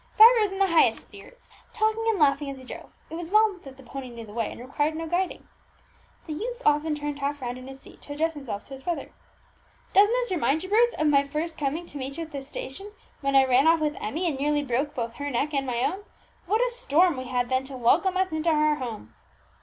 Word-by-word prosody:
Vibert 455 +2 +9
was 415 -2 +1
in 385 - -5
the 390 - +4
highest 335 -4 +4
spirits, - - -15 0.3
talking 440 0 +1
and 445 -2 +2
laughing 285 -2 +2
as 275 - -6
he 260 - -12
drove. 255 - -10 0.2
It - - -8
was 335 0 -5
well 425 -1 +3
that 265 -1 -11
the 270 - -14
pony 265 0 -7
knew 235 -1 -9
the 210 - -12
way, 225 -1 -1
and - - -10
required 290 +5 -1
no 325 +1 -4
guiding. 355 +3 -2 0.8
The 315 - -5
youth 475 +9 -4
often 300 +1 +2
turned 295 -1 -4
half 285 +1 -2
round 245 -1 -5
in 255 - -11
his 270 0 -10
seat, - - -16
to 290 - -8
address 325 +3 0
himself 260 -9 -6
to 275 - -12
his 265 - -9
brother. 345 +4 -4 0.8
"Doesn't 410 +3 +6
this - - 0
remind 315 -2 +1
you, 375 - -7
Bruce, 475 +3 +4
of 310 - 0
my 280 -2 +4
first 310 +4 -4
coming 300 +4 -2
to 290 -4 -8
meet 270 +2 -5
you 335 - -3
at 320 - -11
this 275 -2 -6
station, 390 +9 -7 0.3
when 275 -1 -1
I 270 0 +7
ran 260 +3 +4
off 330 0 +5
with 305 -1 -1
Emmie, 325 +11 -2
and 285 -5 -2
nearly 295 +1 +1
broke 280 +3 -1
both 235 -3 -3
her 285 0 -3
neck 285 +4 -1
and 275 -1 0
my 240 -1 -1
own? 370 +9 -1 0.4
What 430 +5 +2
a - - -2
storm 365 -9 +2
we 255 0 -5
had 245 -1 -1
then 260 0 +1
to 265 -1 -8
welcome 350 +10 +3
us 375 -1 +1
into 315 +1 0
our 305 -1 +3
home!" 225 - -7
295 Hz, 250 wpm, -26 LUFS, 270-355 Hz, 0.8 s, Vibert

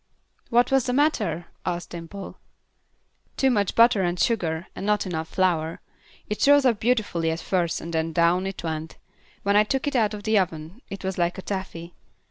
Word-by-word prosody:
"What 240 +1 +3
was 270 -2 +3
the 250 - 0
matter?" 215 - +1 0.2
asked 175 0 -3
Dimple. 175 +3 -8 1.0
"Too 265 -1 +3
much 205 -5 0
butter 230 -3 +5
and 175 -1 -1
sugar, 170 -7 0
and - - -6
not 210 0 +1
enough 160 -3 -3
flour; 170 -4 0 0.5
it 210 +5 0
rose 285 -1 +6
up 235 -5 +3
beautiful 220 -8 0
at 160 +1 -2
first 175 -1 -1
and 170 +1 -7
then 160 0 0
down 170 +3 +2
it 195 -2 -6
went; 160 -1 -4 0.5
when 200 0 +2
I 210 - +6
took 265 +5 -1
it 285 - -2
out 215 -3 +2
of 205 - -9
the 220 -1 +3
oven 165 +4 -4
it 195 - -7
was 190 -1 -3
like 175 0 +1
taffy. 175 -3 -5
190 Hz, 185 wpm, -25 LUFS, 170-220 Hz, 1.0 s, rose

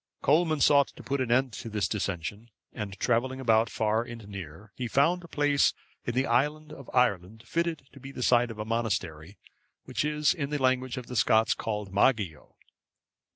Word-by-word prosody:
Colman 155 +1 +3
sought 140 -1 +5
to - - -14
put 140 0 -1
an 120 -2 -1
end 130 0 +2
to 115 - -7
this 105 -2 -1
dissension, 100 +2 -4 0.2
and 100 -2 -6
travelling 130 +6 0
about 115 -3 +3
far 110 +1 0
and 120 -3 -9
near, 100 +1 -9
he 125 - -3
found 165 +9 +2
a - - -10
place 145 -2 +2 0.3
in 120 - -3
the 130 +1 +2
island 150 +5 0
of 140 -4 -11
Ireland 110 -2 +1
fitted 165 -2 -2
to 135 - -13
be 135 +1 -9
the 125 - -5
site 120 0 +4
of 115 - -8
a 105 - -4
monastery, 100 -7 -3 0.5
which, 125 -1 -2
in 150 0 0
the 150 - -1
language 130 0 +1
of 125 - -5
the 125 - -8
Scots, 110 -1 +3
is - - +5
called 105 -3 -4
Mageo. 100 - +1
120 Hz, 190 wpm, -28 LUFS, 105-140 Hz, 0.5 s, sought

